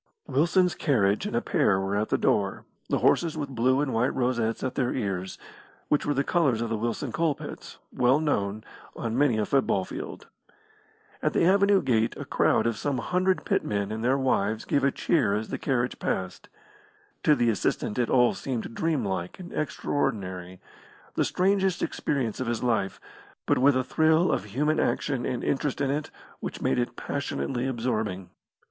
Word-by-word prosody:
Wilson's 175 +5 +2
carriage 110 - +1
and 210 - -2
pair 140 - +2
were 95 +1 -1
at 105 +1 0
the - - +2
door, 100 -2 0 0.2
the - - +2
horses 165 -2 +2
with 145 -2 -3
blue 130 +2 +2
and 145 -3 -1
white 115 +3 +1
rosettes 120 -3 0
at 130 -1 -1
their 125 -2 0
ears, 95 -5 -3 0.5
which 150 - +1
were 145 - +2
the 140 - +2
colours 140 -8 +2
of 115 0 -2
the 115 - 0
Wilson 115 +1 -2
Coal 165 -3 +1
pits, - - -9 0.2
well 125 +4 +3
known, 110 -9 -1 0.3
on 115 -1 -3
many 135 -4 +3
a 105 - +1
football 105 -7 +1
field. - - -7 1.0
At - - 0
the - - +3
avenue 200 +1 +4
gate 115 -3 +1
a - - -6
crowd - - +2
of 115 -2 0
some 140 -2 -1
hundred 180 -1 0
pit - - +1
men 100 -1 -2
and 110 +1 -4
their 130 +3 +3
wives 110 -5 0
gave 140 - +1
a 140 - +5
cheer 130 -7 +1
as 110 +1 -3
the - - -4
carriage 125 -3 -1
passed. 95 -1 -3 0.7
To 150 - +4
the 120 -3 +2
assistant 105 +1 -1
it 120 - +1
all 125 -1 +4
seemed 120 -3 -4
dream 155 -2 0
like 95 - -3
and 180 -1 -9
extraordinary 95 -11 -2 0.5
the - - +1
strangest 190 -1 +1
experience 130 -7 -2
of 130 - -2
his 120 0 -2
life, 115 -5 0 0.5
but - - +2
with 135 0 +5
a 130 - +1
thrill 160 +5 +3
of 100 - -1
human 150 +9 0
action 135 -4 0
and 125 - -3
interest 140 0 -1
in 140 -1 +1
it 145 +1 -2 0.3
which - - -5
made - - +1
it 120 - -2
passionately 135 -2 -3
absorbing. 110 -7 -2
125 Hz, 180 wpm, -27 LUFS, 110-145 Hz, 1.0 s, a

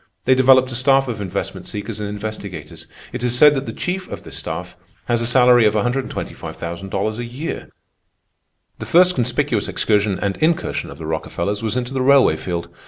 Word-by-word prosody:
They 130 - +5
developed 130 0 +5
a - - -3
staff 135 +1 +3
of 115 -4 -4
investment 95 -3 -4
seekers 105 +1 -5
and 105 -1 -3
investigators. 100 -6 -7 0.3
It - - -4
is 125 0 +1
said 150 +2 +7
that 135 -1 -3
the - - -3
chief 185 +1 -3
of - - -8
this - - -8
staff - - -5 0.3
has 120 -1 +1
a 115 - 0
salary 125 -1 +5
of 105 0 +3
$125,000 105 -4 -3
a - - -3
year. 125 +7 -6 1.1
"The - - -6
first 180 +2 +5
conspicuous 125 -3 0
excursion 105 -2 +1
and 100 -1 -2
incursion 165 +1 0
of - - -10
the 80 - -8
Rockefellers 85 +5 -3
was 115 +2 -1
into 125 +1 -3
the 130 - -1
railway 135 - +5
field. 85 0 -4
120 Hz, 180 wpm, -20 LUFS, 100-130 Hz, 1.1 s, said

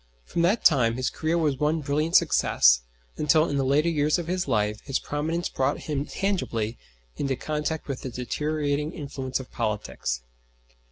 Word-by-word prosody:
From 170 - -1
that 190 +7 +2
time 115 -6 +5
his 130 +1 -1
career 160 +2 0
was 150 -5 +1
one 155 +2 +1
brilliant 150 +3 0
success, - - +5 0.4
until 155 +2 +3
in 140 - -1
the 135 - +1
later 140 +5 +3
years 150 -1 +2
of 175 - -3
his 180 0 -2
life 105 -3 0
his 135 -2 -1
prominence 160 +4 -2
brought 135 +2 -1
him 145 -2 -2
tangibly 120 - -2 0.4
into 135 -2 0
contact 150 +3 -3
with 140 -3 -4
the 130 - -4
deteriorating 150 +4 -2
influence 135 -5 -4
of 130 - -10
politics. 105 - -2
145 Hz, 165 wpm, -26 LUFS, 130-155 Hz, 0.4 s, time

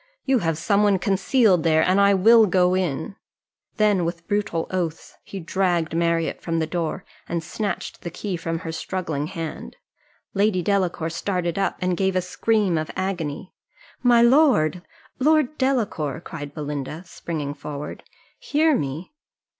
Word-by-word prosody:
You 265 -2 +3
have 165 -5 -1
some 200 +5 +2
one 205 -2 +4
concealed 195 +1 +3
there, 160 -1 +3
and 190 +2 +3
I 200 0 +5
will 220 +3 +6
go 180 -1 +3
in." 180 +1 -2 0.6
Then 210 -4 +3
with 170 0 -4
brutal 205 -5 -1
oaths 175 -3 -3
he 195 - -7
dragged 175 -2 0
Marriott 170 -1 0
from 165 -1 -2
the 160 - +1
door, 170 +2 -3 0.2
and 170 -1 -2
snatched 195 +2 -4
the 170 - -5
key 190 +2 -4
from 165 -1 -3
her 165 - -3
struggling 160 -3 -3
hand. 165 -1 -6 0.6
Lady 200 -2 +2
Delacour 180 -5 0
started 180 0 -2
up, 195 - 0
and 180 0 +1
gave 190 +1 0
a 185 - +2
scream 195 -1 +1
of 155 - -4
agony. 180 -3 -3 0.5
"My 240 -2 +5
lord! 235 - +4 0.4
Lord 305 0 +3
Delacour," 210 - 0
cried 145 -4 -8
Belinda, 150 +1 -5
springing 155 -4 -5
forward, 145 0 -7 0.4
"hear 310 +1 +2
me." 150 - -4
180 Hz, 150 wpm, -23 LUFS, 165-200 Hz, 0.6 s, will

